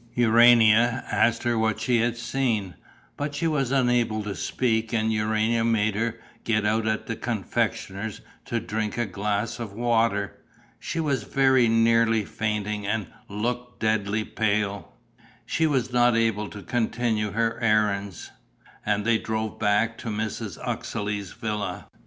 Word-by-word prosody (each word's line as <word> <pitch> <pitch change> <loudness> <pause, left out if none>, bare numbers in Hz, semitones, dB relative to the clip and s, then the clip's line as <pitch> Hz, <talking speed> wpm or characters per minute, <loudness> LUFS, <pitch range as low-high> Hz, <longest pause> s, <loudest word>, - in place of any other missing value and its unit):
Urania 120 0 +5
asked 115 0 +2
her 120 -1 +1
what 110 -1 0
she 115 +2 +1
had 120 +1 0
seen, 120 -6 -1 0.4
but 145 0 -3
she 155 - -2
was 150 -6 +1
unable 120 -5 +1
to 105 -1 -4
speak 110 0 -1
and 110 -1 +1
Urania 110 +2 +1
made 110 -2 +2
her 115 +2 -2 0.3
get 110 -2 +1
out 110 +1 +1
at 110 0 -1
a 115 - -2
confectioner's 105 -2 -3 0.2
to 120 - -1
drink 110 0 -3
a 120 - +1
glass 105 +4 -2
of 110 -4 -6
water. 115 -3 0 0.4
She 165 - -4
was 140 -6 0
very 130 +2 +3
nearly 115 -1 +3
fainting 105 -1 -3
and 105 -4 -2 0.2
looked 120 +4 -3
deathly 110 -1 0
pale. 105 -2 -1 0.5
She 160 - +1
was 130 -4 0
not 120 -1 +4
able 110 -2 0
to 100 -2 -9
continue 110 0 -1
her 115 +1 0
errands; 105 -4 0 0.5
and 105 0 0
they 115 -1 +3
drove 110 -1 -3
back 105 +3 +1
to 120 - -8
Mrs. 110 0 -3
Uxeley's 105 -2 -3
villa. 105 -3 -4
110 Hz, 145 wpm, -25 LUFS, 105-120 Hz, 0.5 s, Urania